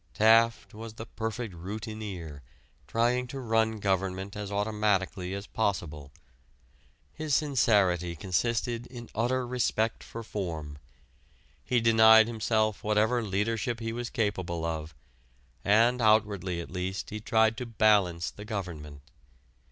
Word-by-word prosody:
Taft 115 +1 +4
was 110 +1 -9
the 115 - -7
perfect 110 -1 -5
routineer 95 -4 -7 0.5
trying 120 +2 +1
to 135 +2 -6
run 110 -2 +1
government 95 -1 -1
as 105 -1 -5
automatically 100 -3 0
as 100 +1 -6
possible. 75 -11 -3 1.0
His 155 -3 -1
sincerity 100 - +2
consisted 115 +6 -1
in 120 -2 -10
utter 125 +3 0
respect 115 -2 -1
for 115 - -8
form: 80 -9 -5 0.8
he 125 - +1
denied 110 -1 +7
himself 110 -2 0
whatever 110 +3 +2
leadership 115 +4 -1
he 115 -1 -3
was 120 0 -4
capable 95 -6 -2
of, 80 -2 -4 0.7
and 115 +4 +4
outwardly 105 -5 +2
at - - -10
least 90 +1 -4
he 105 - -4
tried 110 +1 +2
to 125 -2 -5
"balance" 105 -6 +2
the 105 - -10
government. 85 -9 -6
110 Hz, 120 wpm, -28 LUFS, 95-115 Hz, 1.0 s, denied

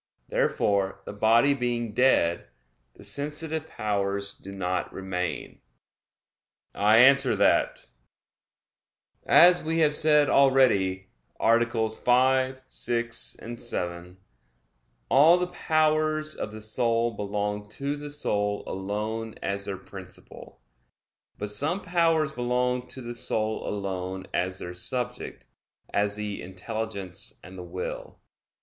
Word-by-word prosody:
Therefore 100 -2 0
the - - -7
body 115 +6 +4
being 120 -4 -2
dead, 100 -9 +2 0.5
the - - -15
sensitive 155 +2 -4
powers 100 -2 -2
do 100 - -12
not 90 -2 -3
remain. 95 -2 -5 1.1
I 105 +2 +4
answer 135 -1 +6
that, 100 0 +2 1.4
As 175 +1 +6
we 160 +1 -1
have 150 -1 +3
said 150 -1 +5
already 110 -9 +3 0.3
(AA. 115 +1 +4 0.2
5, 130 +3 +2
6, 115 -1 -1 0.2
7), 90 -6 -4 0.9
all 155 +6 +6
the 180 - 0
powers 155 -2 0
of - - -6
the 110 0 -9
soul 115 +1 +1
belong 105 0 -3
to 140 +5 -3
the 145 0 -8
soul 105 -8 -1
alone 105 +4 -4
as 100 0 -2
their 100 -1 -4
principle. 95 -7 -12 0.8
But 105 0 -1
some 145 - +2
powers 165 -4 +1
belong 125 -1 -1
to 130 - -7
the 120 0 -6
soul 110 -2 +1
alone 95 -2 -4
as 90 +1 0
their 90 -1 -5
subject; 125 +7 -4 0.5
as 100 0 +2
the 105 -1 -4
intelligence 100 0 -5
and 95 - -12
the 90 - -8
will. 90 +1 -7
115 Hz, 115 wpm, -26 LUFS, 100-135 Hz, 1.4 s, answer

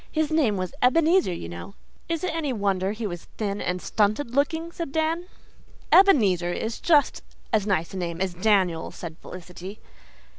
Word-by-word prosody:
"His 310 -1 0
name 270 -11 +2
was 185 -1 -3
Ebenezer, 330 - +4
you 170 - -5
know 85 - -9 0.2
" - - -34
"Is 330 +1 -2
it 365 - -1
any 315 -4 -1
wonder 200 -4 0
he 215 +1 -5
was 175 -4 -5
thin 205 -2 -2
and 180 0 -1
stunted 215 +6 0
looking?" 320 +5 0
said 335 -4 -5
Dan. 320 +3 -1 0.6
"Ebenezer 205 - +5
is 220 +5 -3
just 300 -4 +3 0.3
as 210 -2 +2
nice 180 -4 0
a - - -5
name 170 -2 -3
as 190 -1 -1
Daniel," 185 -3 +1
said 165 -2 -8
Felicity. 180 +3 -9
210 Hz, 175 wpm, -25 LUFS, -, 0.6 s, Ebenezer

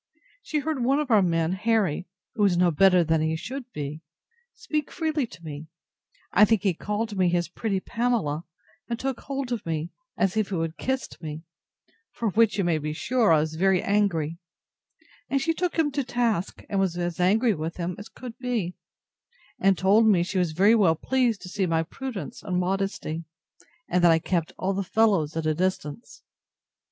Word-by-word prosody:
She 310 - -3
heard 300 -3 -1
one 270 +4 +3
of 295 -4 -2
our 215 -2 +6
men, 165 -2 +1
Harry, 190 -4 0 0.3
who 215 - 0
is 190 -4 +3
no 175 -1 +4
better 180 +2 +5
than 160 -1 +1
he 160 +1 0
should 250 +8 -6
be, 150 -1 -5 0.5
speak 300 -2 -3
freely 310 -6 -1
to 170 - -14
me; 155 0 -7 0.6
I - - +6
think 215 -2 +3
he 195 -3 +2
called 210 +5 -3
me 185 -2 +3
his 175 0 +1
pretty 195 +3 -2
Pamela, 220 -9 -1 0.4
and 235 - -1
took 265 -2 -2
hold 275 -2 -4
of 235 -4 -2
me, 165 +1 -3 0.3
as 195 0 +1
if 215 -2 0
he 195 - -2
would 165 -1 -1
have 165 - -29
kissed 265 -9 -3
me; 155 0 -6 0.7
for 230 -2 -1
which, 220 0 +3
you 195 - +1
may 170 -3 +1
be 150 0 -3
sure, 230 +5 +2
I 155 -2 +5
was 155 0 -3
very 185 +2 +2
angry: 170 -6 +1 0.9
and 275 - +2
she 325 +4 +1
took 355 +1 -2
him 310 -3 +2
to 280 0 -1
task, 235 -7 -1
and 200 - -1
was 185 -3 0
as 175 -1 -3
angry 215 +6 +3
at 160 -1 -4
him 175 0 -3
as 205 - -9
could 245 -3 -9
be; 235 -8 -2 0.9
and 195 -1 +3
told 205 +4 +4
me 185 -5 +4
she 185 +2 -2
was 175 -3 0
very 200 +7 +5
well 190 -8 +4
pleased 245 +3 0
to - - -7
see 190 0 -1
my 165 -1 +1
prudence 235 +4 -6
and 180 -2 -2
modesty, 180 -3 -2 0.6
and 180 0 +1
that 170 - +7
I 165 - +5
kept 165 0 -1
all 190 +1 -1
the 195 - -1
fellows 190 -7 +2
at 160 - -2
a 155 - +2
distance. 185 +2 -3
190 Hz, 195 wpm, -26 LUFS, 165-230 Hz, 0.9 s, that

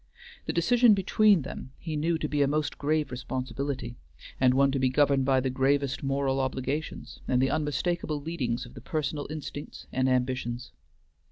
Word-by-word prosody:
The - - +1
decision 230 +6 +5
between 200 -2 +4
them 130 0 -8
he 160 -3 -5
knew 160 +3 +1
to 155 - -2
be 145 -1 0
a 140 - +4
most 150 +1 -1
grave 150 0 0
responsibility, 130 - -4 0.4
and 130 -1 +4
one 140 0 +4
to 135 - 0
be 130 0 +3
governed 140 0 +3
by 135 -1 +4
the 130 0 -1
gravest 135 +1 +1
moral 135 -1 0
obligations, 135 +3 -3
and 125 - +2
the 135 +1 +2
unmistakable 155 +1 -1
leadings 140 -7 -2
of 120 - -13
the - - -10
personal 150 -1 -2
instincts 150 -1 -7
and 130 0 +2
ambitions. 125 -1 -1
140 Hz, 170 wpm, -28 LUFS, 130-155 Hz, 0.4 s, decision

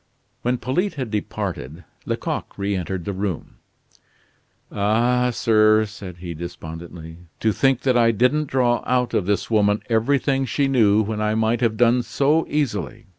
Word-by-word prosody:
When 125 +1 0
Polyte 180 +12 -1
had 130 -6 -4
departed, 90 - -4 0.2
Lecoq - - -3
reentered 95 -3 -3
the 100 - -3
room. 95 -3 -4 1.1
"Ah, 120 +5 +2
sir," 110 -2 +3
said 100 -4 -9
he, 85 -1 -6
despondently, 80 0 -8 0.2
"to 110 - +2
think 135 +3 +2
that 130 -2 +2
I 115 -1 +4
didn't 125 +7 +2
draw 125 -3 +1
out 125 -1 +1
of 90 - 0
this 100 +2 -1
woman 105 -1 +2
everything 135 +4 +1
she 140 +1 +1
knew, 110 -5 +4
when 105 0 -3
I 105 0 +1
might 110 +2 +1
have 115 -2 +1
done 120 +1 +4
so 145 +6 +1
easily. 110 - -2
110 Hz, 150 wpm, -22 LUFS, 100-125 Hz, 1.1 s, I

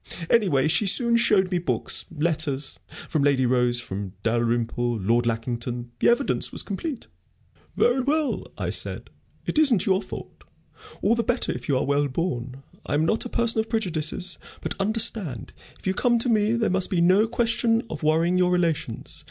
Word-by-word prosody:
Anyway, 170 - +3
she 165 +7 +2
soon 235 +4 +4
showed 200 -5 +3
me 180 - +1
books, 175 - -2
letters 150 -3 -1 0.3
from 155 - 0
Lady 140 -2 +3
Rose, 125 -1 +2
from 100 -4 -6
Dalrymple, 120 +1 0
Lord 115 +4 +1
Lackington 120 +1 -3
the - - +4
evidence 240 +4 +1
was - - +2
complete.... 235 - -5 0.7
"'Very 245 +2 +3
well,' 295 +3 -1
I - - -2
said; - - -2 0.3
'it - - 0
isn't 255 - +4
your 190 0 +2
fault. 190 - -10 0.6
All 210 - +4
the 235 - +1
better 245 +2 0
if - - -7
you 135 - +3
are - - 0
well 145 +1 +1
born 130 -3 -4 0.2
I - - -2
am 155 +2 +2
not 220 +9 +1
a - - -5
person 235 -1 +1
of 220 0 -2
prejudices. 180 -4 -2 0.2
But - - -4
understand, 210 - 0 0.2
if - - -20
you 190 - +1
come 240 +4 +2
to 235 +2 0
me, 215 -1 +2
there 230 -4 +1
must 190 0 0
be 180 - 0
no 185 +6 +4
question 230 0 +1
of 225 - -7
worrying 165 +4 +2
your 180 0 +3
relations. 165 -10 -1
180 Hz, 175 wpm, -24 LUFS, -, 0.7 s, soon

